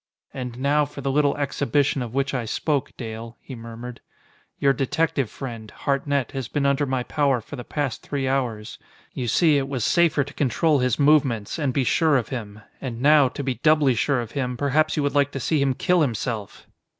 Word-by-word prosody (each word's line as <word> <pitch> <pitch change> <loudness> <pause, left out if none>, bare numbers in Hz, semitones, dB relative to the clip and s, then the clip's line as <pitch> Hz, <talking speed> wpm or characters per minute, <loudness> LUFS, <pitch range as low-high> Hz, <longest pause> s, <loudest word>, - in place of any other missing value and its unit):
"And 125 -2 -6
now 145 +3 +2
for 145 0 -7
the 135 0 -1
little 145 0 +2
exhibition 140 -1 0
of 120 -2 -4
which 140 0 0
I 125 -3 -1
spoke, 140 +5 -1
Dale," 115 0 -7
he 135 - -10
murmured. 115 +1 -8 0.6
"Your 140 0 +3
detective 135 -1 0
friend, 115 -4 -7
Hartnett, 140 0 -1
has 135 -4 -4
been 140 +3 -1
under 140 +1 +2
my 130 -1 -1
power 140 -2 +1
for 115 +6 -9
the 125 - -7
past 145 -2 -3
three 140 -2 -3
hours. 120 -6 -2 0.3
You 125 - -3
see, 155 +3 +4
it 135 0 -3
was 130 -5 -2
safer 165 -2 +3
to 140 +1 -11
control 145 +3 +2
his 125 -2 +1
movements, 140 -5 +2
and 145 -4 +1
be 135 +1 +1
sure 155 +2 +3
of 120 - -2
him. 110 -4 -6 0.2
And 120 -3 -5
now, 145 0 +5
to 140 - -6
be 130 -2 -2
doubly 150 -4 +4
sure 125 +3 +1
of 115 -2 -7
him, 125 -2 -2
perhaps 155 +4 +1
you 150 - +1
would 145 - 0
like 145 -1 +3
to 135 - -3
see 150 +3 +1
him 135 -2 +1
kill 180 +3 +2
himself!" 115 -6 -3
135 Hz, 205 wpm, -24 LUFS, 125-145 Hz, 0.6 s, now